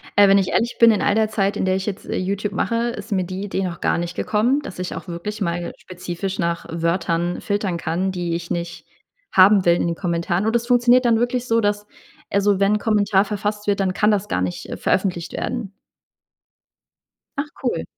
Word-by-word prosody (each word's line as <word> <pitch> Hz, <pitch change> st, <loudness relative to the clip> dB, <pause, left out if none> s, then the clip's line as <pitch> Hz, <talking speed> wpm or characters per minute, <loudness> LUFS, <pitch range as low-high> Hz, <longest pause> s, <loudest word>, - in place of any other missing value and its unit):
Äh, 205 Hz, 0 st, +7 dB
wenn 195 Hz, 0 st, +6 dB
ich 190 Hz, -2 st, +1 dB
ehrlich 235 Hz, +1 st, 0 dB
bin, 230 Hz, -1 st, +8 dB
in 215 Hz, -, 0 dB
all 205 Hz, -, +2 dB
der 220 Hz, -1 st, +2 dB
Zeit, 200 Hz, -2 st, 0 dB
in -, -, 0 dB
der 185 Hz, 0 st, +2 dB
ich 190 Hz, 0 st, -2 dB
jetzt, 200 Hz, -3 st, -5 dB
äh, -, -, -3 dB
YouTube 200 Hz, +2 st, -2 dB
mache, 230 Hz, +3 st, 0 dB
ist 235 Hz, -1 st, -7 dB
mir 190 Hz, -2 st, +1 dB
die 185 Hz, +2 st, -5 dB
Idee 195 Hz, -1 st, -2 dB
noch 175 Hz, -3 st, -5 dB
gar -, -, +1 dB
nicht 170 Hz, 0 st, -4 dB
gekommen, 235 Hz, +7 st, +1 dB
dass 195 Hz, -, -9 dB
ich 180 Hz, -, -4 dB
auch -, -, -8 dB
wirklich 180 Hz, +5 st, -5 dB
mal 175 Hz, -2 st, -2 dB
spezifisch 185 Hz, +1 st, -5 dB
nach 170 Hz, -1 st, -1 dB
Wörtern 170 Hz, +1 st, -1 dB
filtern 200 Hz, -4 st, -1 dB
kann, 175 Hz, +4 st, -1 dB
die 175 Hz, -2 st, -2 dB
ich 170 Hz, 0 st, -6 dB
nicht 170 Hz, 0 st, -4 dB, 0.5 s
haben 190 Hz, +1 st, +6 dB
will 170 Hz, 0 st, +5 dB
in 170 Hz, -, 0 dB
den 170 Hz, -, -1 dB
Kommentaren. 175 Hz, +2 st, -1 dB
Und, 225 Hz, +1 st, +1 dB
das 235 Hz, 0 st, 0 dB
funktioniert 245 Hz, 0 st, +4 dB
dann 230 Hz, -2 st, +4 dB
wirklich 245 Hz, +1 st, -1 dB
so, 230 Hz, 0 st, +3 dB
dass, 205 Hz, 0 st, -1 dB, 0.4 s
also 200 Hz, 0 st, +2 dB
wenn 200 Hz, +1 st, +3 dB
'n -, -, -1 dB
Kommentar 205 Hz, -2 st, +2 dB
verfasst 210 Hz, 0 st, -3 dB
wird, 205 Hz, -1 st, +1 dB
dann 190 Hz, -1 st, +1 dB
kann 210 Hz, +2 st, +3 dB
das 205 Hz, 0 st, 0 dB
gar 90 Hz, -, -1 dB
nicht, 90 Hz, -1 st, -3 dB
äh, -, -, -5 dB
veröffentlicht 185 Hz, -3 st, -1 dB
werden? 215 Hz, -6 st, -4 dB, 1.6 s
Ach, 290 Hz, +1 st, -2 dB
cool. 245 Hz, -, -1 dB
195 Hz, 215 wpm, -21 LUFS, 175-210 Hz, 1.6 s, bin